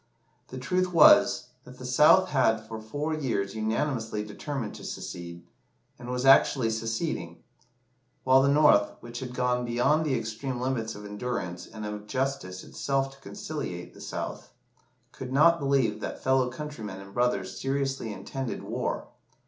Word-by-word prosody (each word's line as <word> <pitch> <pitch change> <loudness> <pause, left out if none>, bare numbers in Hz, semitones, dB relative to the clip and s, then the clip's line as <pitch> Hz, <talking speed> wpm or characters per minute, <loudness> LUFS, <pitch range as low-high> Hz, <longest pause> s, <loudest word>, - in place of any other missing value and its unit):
The 130 - -8
truth 180 +7 0
was, 150 -5 +6
that 125 0 -13
the 125 - -9
South 150 +9 +5
had 115 -7 +2
for 110 0 -7
four 145 +8 -3
years 120 -10 -1
unanimously 110 0 -1
determined 120 +2 -5
to - - -10
secede, 85 -1 -7 0.6
and 120 - -8
was 125 +1 -2
actually 135 -3 +5
seceding; 110 - -3 0.8
while 130 +1 +6
the 140 - +3
North, 140 -8 +5
which 120 0 -7
had 125 -1 -6
gone 125 0 +1
beyond 120 +6 +2
the 140 -5 +1
extreme 115 +3 -4
limits 125 -3 -2
of 105 0 -9
endurance 105 -4 -4
and 110 -1 -8
of 105 0 -6
justice 130 -8 -2
itself 135 -1 -1
to 135 - -17
conciliate 90 - -6
the - - -14
South, - - -5 0.6
could 130 -1 -8
not 165 +5 +5
believe 135 -7 +1
that - - -6
fellow 130 -1 +3
countrymen 125 -8 -7
and 100 0 -12
brothers 100 -6 0
seriously 135 -3 -1
intended 130 +4 -5
war. - - -3
125 Hz, 150 wpm, -28 LUFS, 110-135 Hz, 0.8 s, was